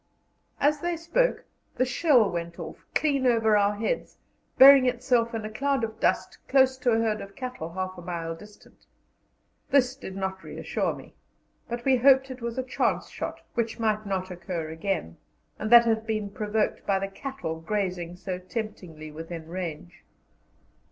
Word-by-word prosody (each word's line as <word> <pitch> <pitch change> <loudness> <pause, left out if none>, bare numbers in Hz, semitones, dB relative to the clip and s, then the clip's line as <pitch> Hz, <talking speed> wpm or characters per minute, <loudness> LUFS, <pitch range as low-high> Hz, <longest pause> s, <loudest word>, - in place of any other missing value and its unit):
As 295 +1 +3
they 345 +2 -2
spoke, 345 +10 0 0.3
the 255 - +2
shell 255 -3 +4
went 170 0 -4
off, 160 -3 -9
clean 280 -4 +2
over 225 -3 +4
our 205 0 +3
heads, 230 - -3 0.4
burying 270 -1 +9
itself 245 -1 +1
in 220 -1 -3
a - - -4
cloud 275 +2 0
of 220 0 -4
dust - - 0
close 265 -1 +4
to 255 -1 0
a 225 - +4
herd 220 -2 0
of 195 0 -10
cattle 250 -11 -6
half 185 0 -4
a - - -8
mile 170 -1 -4
distant. 210 +5 -17 0.8
This 260 -2 +3
did 220 -8 -8
not 190 -1 -4
reassure - - -2
me, - - -13 0.6
but 240 0 -4
we 265 -1 +4
hoped 265 +1 +5
it 255 -1 -9
was 235 0 -4
a 260 - 0
chance 255 - -1
shot, - - -6
which 230 -2 -1
might 215 -2 0
not 190 -1 -2
occur 175 -2 -5
again, 160 - -3 0.4
and 215 - -2
that 235 0 +9
it - - +2
had 220 0 0
been 215 -2 -2
provoked 210 +1 -1
by 195 - +3
the 195 +1 -2
cattle 195 -6 -5
grazing 180 -2 -2
so 180 0 -5
temptingly 180 -6 -6
within 165 +1 -7
range. 175 -1 -6
215 Hz, 170 wpm, -27 LUFS, 185-255 Hz, 0.8 s, burying